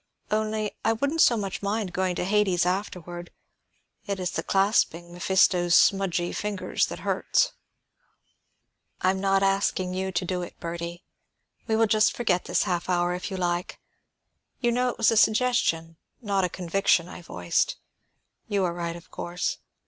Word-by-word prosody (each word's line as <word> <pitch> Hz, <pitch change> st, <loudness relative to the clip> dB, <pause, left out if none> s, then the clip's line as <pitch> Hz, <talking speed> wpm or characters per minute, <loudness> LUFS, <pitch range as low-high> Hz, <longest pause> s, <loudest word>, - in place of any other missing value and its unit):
Only, 215 Hz, 0 st, 0 dB
I 225 Hz, -, +3 dB
wouldn't 280 Hz, +8 st, 0 dB
so 235 Hz, -, +5 dB
much 195 Hz, -3 st, -4 dB
mind 200 Hz, -1 st, -2 dB
going 185 Hz, -1 st, 0 dB
to -, -, -2 dB
Hades 195 Hz, -3 st, +2 dB
afterward; 175 Hz, -2 st, -3 dB, 0.8 s
it 200 Hz, -1 st, -2 dB
is 180 Hz, -1 st, -2 dB
the -, -, -2 dB
clasping 195 Hz, -4 st, +1 dB
Mephisto's 175 Hz, -1 st, +3 dB
smudgy 180 Hz, -3 st, +3 dB
fingers 205 Hz, -2 st, -1 dB
that -, -, -7 dB
hurts." -, -, +1 dB, 1.5 s
"I 185 Hz, -, +4 dB
am 190 Hz, -, -3 dB
not 195 Hz, 0 st, +2 dB
asking 195 Hz, -1 st, +1 dB
you 190 Hz, +1 st, -2 dB
to 180 Hz, 0 st, -1 dB
do 180 Hz, 0 st, -2 dB
it, 175 Hz, -, -8 dB
Bertie. 170 Hz, +1 st, -5 dB, 0.6 s
We 220 Hz, -, +1 dB
will 225 Hz, +1 st, +4 dB
just 215 Hz, 0 st, +3 dB
forget 190 Hz, -7 st, +1 dB
this -, -, +1 dB
half 175 Hz, 0 st, -2 dB
hour, 175 Hz, 0 st, +1 dB
if 180 Hz, -, -4 dB
you 190 Hz, -, -4 dB
like. 175 Hz, -1 st, -2 dB, 0.8 s
You 240 Hz, -2 st, +1 dB
know 250 Hz, +1 st, +1 dB
it -, -, -5 dB
was 225 Hz, -, +4 dB
a 225 Hz, -, +1 dB
suggestion, 215 Hz, -9 st, +2 dB, 0.2 s
not 200 Hz, -5 st, 0 dB
a 180 Hz, -, +1 dB
conviction, 180 Hz, -1 st, +1 dB
I 180 Hz, -, -9 dB
voiced. 90 Hz, -, -1 dB, 0.7 s
You 200 Hz, -2 st, 0 dB
are 170 Hz, -, -1 dB
right, 170 Hz, -1 st, -4 dB
of 170 Hz, +1 st, -13 dB
course. 175 Hz, +1 st, -3 dB
185 Hz, 165 wpm, -26 LUFS, 175-210 Hz, 1.5 s, so